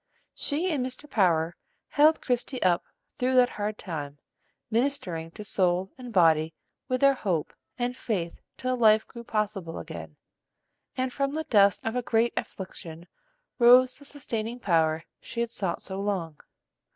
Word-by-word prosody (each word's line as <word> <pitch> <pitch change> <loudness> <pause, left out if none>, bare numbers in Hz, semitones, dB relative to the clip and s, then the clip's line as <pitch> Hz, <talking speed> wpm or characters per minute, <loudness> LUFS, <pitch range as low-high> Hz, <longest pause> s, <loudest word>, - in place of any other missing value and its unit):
She 330 +5 -1
and 280 -5 0
Mr. 260 +3 -6
Power 170 - +2 0.3
held 305 +2 +4
Christie 250 +1 -1
up 175 -2 +3 0.4
through 255 +1 +1
that 250 -1 +6
hard 210 +1 -3
time, 145 -5 -6 0.5
ministering 220 - -1
to 210 - -6
soul 185 -1 +1
and 250 -2 -9
body 160 -4 +4 0.3
with 255 0 -1
their 275 0 +6
hope 185 - -2 0.2
and 245 0 -1
faith 185 -10 -3 0.2
till 255 0 -1
life 220 -3 +5
grew 235 - -10
possible 210 -7 -2
again, 80 -2 -8 0.8
and 255 -1 -1
from 275 0 -1
the 315 +1 -2
dust 200 -9 +4
of 225 +1 -1
a 250 - +1
great 235 0 +1
affliction 170 -3 -6 0.5
rose 250 +1 +6
the 285 - -14
sustaining 240 -5 -4
power 160 -6 +2 0.2
she 235 - -7
had 235 -1 -1
sought 190 -6 -3
so 190 0 -4
long. 180 -7 -2
215 Hz, 150 wpm, -27 LUFS, 175-255 Hz, 0.8 s, that